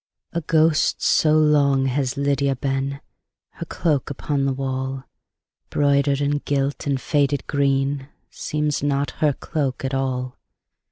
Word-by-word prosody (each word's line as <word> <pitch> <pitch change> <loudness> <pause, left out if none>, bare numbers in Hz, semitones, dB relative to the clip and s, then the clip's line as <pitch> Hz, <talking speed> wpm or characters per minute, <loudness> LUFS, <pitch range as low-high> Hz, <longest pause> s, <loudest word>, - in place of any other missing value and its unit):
A 170 - -1
ghost 160 0 +2
so 155 -1 +4
long 145 -3 +4
has 135 0 -1
Lydia 140 -1 +1
been, 135 +1 -2 0.5
Her - - -7
cloak 150 -6 0
upon 140 0 -1
the 135 - +1
wall, 130 0 -3 0.7
Broidered, 140 -1 +2
and 145 0 0
gilt, 140 0 -1
and 140 -2 +1
faded 145 0 0
green, 140 -1 0 0.2
Seems 150 -1 -2
not 140 0 0
her 150 -2 +3
cloak 135 -3 -3
at 135 - -3
all. 130 -1 -2
140 Hz, 130 wpm, -22 LUFS, 135-145 Hz, 0.7 s, so